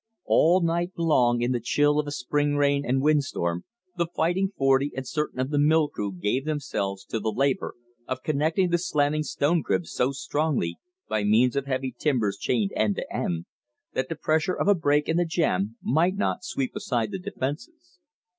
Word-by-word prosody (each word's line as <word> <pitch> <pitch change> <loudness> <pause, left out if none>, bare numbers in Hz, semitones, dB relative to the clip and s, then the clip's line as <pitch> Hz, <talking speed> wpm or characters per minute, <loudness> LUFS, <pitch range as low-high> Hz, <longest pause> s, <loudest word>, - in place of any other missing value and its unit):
All 175 +3 +4
night 170 +2 0
long 125 -8 +3
in 120 - +1
the 125 - 0
chill 145 +5 +2
of 150 - -1
a - - -3
spring 145 +2 0
rain 140 0 +2
and 135 0 0
windstorm 130 - 0 0.3
the 170 - +1
Fighting 175 +3 0
Forty 135 +1 +3
and 135 0 -5
certain 150 -3 -3
of 130 +2 -1
the 145 - +2
mill 155 +1 +4
crew 100 -1 -4
gave 105 +8 -1
themselves 125 -10 -3
to 115 - -3
the 110 - -1
labor 135 +5 0 0.3
of 130 0 -4
connecting 160 +5 +1
the 175 - +3
slanting 150 -3 +1
stone 155 +2 +1
cribs 170 - -1
so 125 +2 +1
strongly, 135 - -1 0.3
by 110 -1 -1
means 115 +5 +3
of 140 0 -1
heavy 130 -1 -2
timbers 120 -8 0
chained 110 -6 0
end 105 -2 +1
to - - -5
end, 85 -1 -2 0.5
that 130 0 -2
the 165 - -3
pressure 160 +4 0
of - - -1
a 205 - +7
break 150 -4 +1
in 160 - +1
the 175 - +3
jam 115 - 0
might 170 +7 +2
not 200 - -1
sweep 135 -7 -3
aside 115 -3 -1
the 190 - -4
defenses. 135 -2 -6
140 Hz, 190 wpm, -26 LUFS, 120-160 Hz, 0.5 s, a